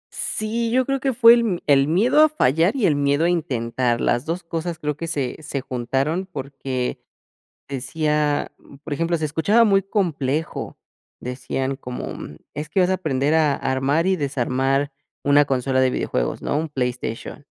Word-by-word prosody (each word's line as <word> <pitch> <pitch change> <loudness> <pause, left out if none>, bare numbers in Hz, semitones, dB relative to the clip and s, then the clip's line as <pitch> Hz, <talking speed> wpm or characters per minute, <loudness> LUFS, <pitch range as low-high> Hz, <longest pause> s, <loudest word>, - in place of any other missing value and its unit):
Sí, 230 +2 -1
yo 255 +2 +2
creo 275 +1 -1
que 270 0 0
fue 230 -1 +8
el 240 - +4
m 210 -7 0
el 140 -1 +4
miedo 220 - +4
a 310 - +7
fallar 170 - +2
y 250 -7 +1
el 155 -5 +3
miedo 145 +2 +2
a - - +3
intentar. 125 -7 -1
Las 120 +1 +1
2 175 +2 -2
cosas 165 0 -4
creo 150 -2 -2
que 165 +3 -5
se 140 -6 -2
se 140 -2 -4
juntaron 135 +8 -2
porque 135 -3 -4 0.7
decía, 150 +2 -1
mm, 140 - -17
por 145 +1 -6
ejemplo, 165 +3 0
se 155 - -1
escuchaba 165 +10 +3
muy 195 -2 +3
complejo. 160 - -2 0.4
Decían 130 +2 -3
como, 125 -2 -6
mm: - - -9 0.2
"Es 150 +1 -5
que 190 - 0
vas 180 -1 +3
a 190 - +3
aprender 150 -4 0
a 155 -3 +3
armar 135 +6 0
y 190 - +3
desarmar 135 -1 0 0.3
una 145 +1 +5
consola 130 -1 0
de 130 -1 +3
videojuegos", - - -2
¿no? - - -1
Un 160 +1 -2
PlayStation, 125 0 -4
150 Hz, 175 wpm, -22 LUFS, 135-175 Hz, 0.7 s, fue